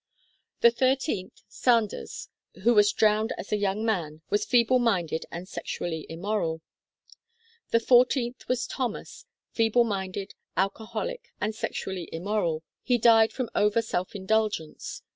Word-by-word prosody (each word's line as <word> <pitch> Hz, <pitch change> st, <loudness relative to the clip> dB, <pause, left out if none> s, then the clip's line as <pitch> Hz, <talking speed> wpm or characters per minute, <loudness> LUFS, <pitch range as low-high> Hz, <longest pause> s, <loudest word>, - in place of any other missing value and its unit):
The 235 Hz, -, +7 dB
thirteenth, 255 Hz, -5 st, -1 dB
Sanders, 230 Hz, -4 st, 0 dB, 0.3 s
who 240 Hz, +2 st, +5 dB
was 210 Hz, -1 st, +5 dB
drowned 215 Hz, +1 st, +2 dB
as -, -, -8 dB
a -, -, +3 dB
young 205 Hz, +1 st, -1 dB
man, 160 Hz, -8 st, -2 dB
was 205 Hz, -, +2 dB
feeble 245 Hz, +1 st, +4 dB
minded 180 Hz, -9 st, 0 dB
and 175 Hz, +2 st, -7 dB
sexually 160 Hz, -4 st, -4 dB
immoral. 165 Hz, -2 st, -2 dB, 1.1 s
The 230 Hz, -, +4 dB
fourteenth 245 Hz, +1 st, +3 dB
was 250 Hz, -1 st, 0 dB
Thomas, 260 Hz, -, -5 dB, 0.2 s
feeble 225 Hz, +1 st, +3 dB
minded, 195 Hz, -3 st, -4 dB, 0.2 s
alcoholic, 220 Hz, -, -2 dB
and 215 Hz, +1 st, -1 dB
sexually 190 Hz, -4 st, -4 dB
immoral. 170 Hz, -2 st, -1 dB, 0.2 s
He 250 Hz, -1 st, +2 dB
died 225 Hz, -1 st, +5 dB
from 255 Hz, -3 st, -4 dB
over 210 Hz, +2 st, +3 dB
self 185 Hz, -4 st, -3 dB
indul 215 Hz, +2 st, +2 dB
gence. 160 Hz, -5 st, -7 dB
215 Hz, 130 wpm, -27 LUFS, 190-235 Hz, 1.1 s, The